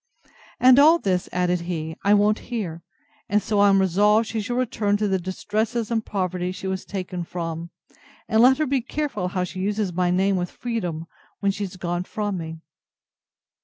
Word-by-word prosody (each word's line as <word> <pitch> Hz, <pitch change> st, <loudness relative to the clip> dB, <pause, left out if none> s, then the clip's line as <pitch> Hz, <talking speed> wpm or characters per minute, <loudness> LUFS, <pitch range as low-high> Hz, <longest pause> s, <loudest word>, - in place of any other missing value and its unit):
—And 255 Hz, +2 st, +7 dB
all 315 Hz, +4 st, +7 dB
this, 185 Hz, -, -1 dB
added 180 Hz, 0 st, +1 dB
he, 160 Hz, -2 st, -4 dB
I 205 Hz, +1 st, +5 dB
won't 210 Hz, +1 st, +3 dB
hear; 185 Hz, -9 st, -4 dB, 0.5 s
and 205 Hz, +2 st, +3 dB
so 210 Hz, +1 st, -1 dB
I 205 Hz, 0 st, +6 dB
am 195 Hz, 0 st, +5 dB
resolved 205 Hz, +4 st, +3 dB
she 225 Hz, -1 st, -2 dB
shall 240 Hz, +4 st, -3 dB
return 215 Hz, -5 st, 0 dB
to 210 Hz, 0 st, 0 dB
the 190 Hz, -1 st, +1 dB
distresses 215 Hz, +5 st, -2 dB
and 225 Hz, -1 st, 0 dB
poverty 185 Hz, -3 st, -2 dB
she 185 Hz, -, -8 dB
was 190 Hz, 0 st, -3 dB
taken 185 Hz, -2 st, -4 dB
from; 165 Hz, -1 st, -5 dB, 0.6 s
and 220 Hz, 0 st, +3 dB
let 260 Hz, +2 st, +6 dB
her 310 Hz, -, +1 dB
be 270 Hz, -2 st, 0 dB
careful 260 Hz, -7 st, -3 dB
how 180 Hz, 0 st, -1 dB
she 180 Hz, +1 st, -6 dB
uses 200 Hz, -1 st, -1 dB
my 180 Hz, +1 st, +1 dB
name 190 Hz, +2 st, +2 dB
with 175 Hz, -1 st, -2 dB
freedom, 180 Hz, -10 st, -4 dB, 0.3 s
when 200 Hz, -1 st, +1 dB
she 200 Hz, +1 st, -3 dB
is 185 Hz, -1 st, -9 dB
gone 175 Hz, 0 st, -2 dB
from 205 Hz, -1 st, -3 dB
me. 160 Hz, 0 st, -7 dB
195 Hz, 190 wpm, -23 LUFS, 180-220 Hz, 0.6 s, And